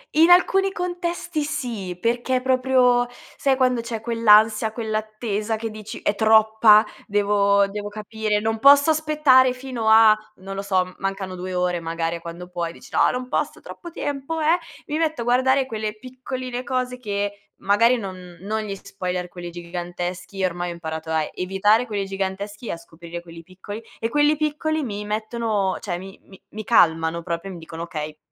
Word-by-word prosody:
In 325 +2 +6
alcuni 385 +2 +5
contesti, 350 -2 -3
sì, 215 - -4
perché 240 +5 0
proprio 255 -1 +3 0.3
sai, 275 -1 +2
quando 255 -2 +2
c'è 230 -1 -5
quell'ansia, 220 -1 +4
quell'attesa 215 -1 -2
che 225 +1 -4
dici: 215 -1 -8
"È 205 - 0
troppa, 220 0 +6 0.2
devo 200 -1 +3
devo 205 +1 -5
capire, 215 0 -2
non 220 +1 -1
posso 280 +4 +7
aspettare 300 -5 +4
fino 250 -3 -5
a" 220 0 +8 0.3
non 195 0 -6
lo 195 - -3
so, 190 -2 +2
m 185 0 -13
mancano 195 -1 -4
2 185 +1 -5
ore 180 -1 0
magari 165 0 -2
a - - -11
quando 170 +2 -9
puoi, 170 -2 -3
dici: - - -15
"No, - - +4
non 250 0 -4
posso - - -2
troppo 345 - -10
tempo"; 290 0 -4
eh, 320 +3 +4 0.3
mi 300 - -2
metto 315 -5 0
a - - -1
guardare 260 +3 +3
quelle 215 -3 -4
piccoline 255 +1 -6
cose 255 -1 -2
che 205 -3 -4
magari 230 +5 +4
non 185 -5 -7
non 215 +3 -2
gli 200 -2 -4
spoiler 180 -2 -5
quelli 175 0 -8
giganteschi, 175 +2 -5
ormai 175 -1 -1
ho - - -5
imparato 160 -1 -6
a 160 -1 +1
evitare 200 +5 +2
quelli 205 -4 -3
giganteschi 195 +3 -4
e - - -2
a - - -5
scoprire 170 +1 -10
quelli 165 -1 -12
piccoli, 190 +5 -9 0.2
e 225 - -2
quelli 295 +4 +3
piccoli 305 +1 -1
mi 210 -4 -5
mettono 215 -2 -1
cioè 180 -5 -4
mi 190 +2 -10
mi 190 - -17
mi 215 0 -7
calmano 165 -6 +3
proprio, 170 +2 -4
mi 175 - -9
dicono: 165 0 -7
"Okay, 155 -3 -6
215 Hz, 175 wpm, -23 LUFS, 185-250 Hz, 0.3 s, a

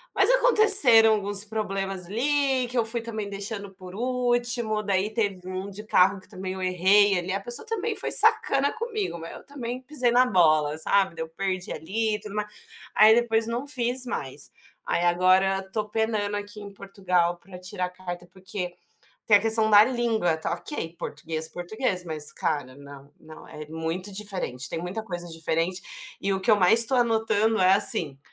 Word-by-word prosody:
mas - - +2
aconteceram 400 - +7
alguns 205 -1 0
problemas 195 -3 -4
ali 265 +4 -1
que 250 - -4
eu 230 - +1
fui 230 +1 0
também 220 -3 -6
deixando 200 0 -6
por 185 -1 -12
último 240 -2 -1
daí 200 +1 -1
teve 200 -5 -3
um 185 +1 -6
de 200 +2 -10
carro 195 -2 +2
que - - -16
também 185 0 -7
eu 190 - -8
errei 190 +2 +3
ali 175 +1 -6
a 195 - -2
pessoa 240 - -3
também 450 0 -3
foi - - -2
sacana 275 +1 +5
comigo, 445 - -5
mas 165 +1 -9
eu - - -13
também 255 -3 -7
pisei 255 -2 -2
na 250 +2 +4
bola 155 -7 +2
sabe, 190 +2 0
daí 160 - -5
eu 160 - -11
perdi 185 +1 -4
ali 210 +5 -3
tudo 210 -1 -10
mais. 210 0 -4 0.4
Aí 215 +1 +6
depois 225 -1 0
não 240 +4 -4
fiz 250 -2 0
mais, 140 - -6 0.3
aí 170 - -1
agora 185 +2 +2
tô 210 -1 -3
penando 215 -2 -2
aqui 205 +1 -9
em 200 -1 -11
Portugal 185 -3 -2
para 185 +1 -14
tirar 180 0 -5
carta 175 -1 -9
porque, 185 -1 -8 0.5
tem 210 - +6
a - - -7
questão 220 0 +2
da 210 0 +7
língua, 230 -8 -1
tá 160 +1 -4
ok, 175 - -7
português 160 +1 -5
português 180 +3 -4
mas 155 -3 -5
cara, 145 -5 -4
não, 140 0 -14
não, 155 0 -14
é 155 0 -10
muito 165 +5 -4
diferente, 190 -11 -3
tem 165 - -5
muita 180 +6 -6
coisa 175 -4 -7
diferente, 165 +2 -3 0.4
e 195 - -2
o 190 - -2
que 230 - 0
eu 215 - +5
mais 205 +5 +6
tô 265 - -1
anotando 225 -2 0
é 185 0 +4
assim, 165 - +6
200 Hz, 180 wpm, -24 LUFS, 180-230 Hz, 0.5 s, aconteceram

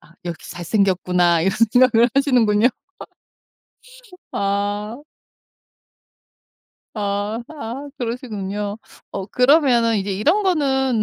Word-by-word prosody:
'아 165 +3 -22
역시 170 -2 -7
잘생겼구나.' 180 -2 +1
이런 190 - +2 0.2
생각을 245 -2 +5
하시는군요. 245 -5 +3 1.6
아. 205 +2 -2 2.0
아 205 +2 -2
아 280 -1 -7
그러시군요. 210 -4 -4 0.3
어 195 - -5
그러면은 250 -3 +3
이제 195 0 -3
이런 315 - +1
거는 265 - +1
220 Hz, 200 characters per minute, -20 LUFS, 200-255 Hz, 2.0 s, 생각을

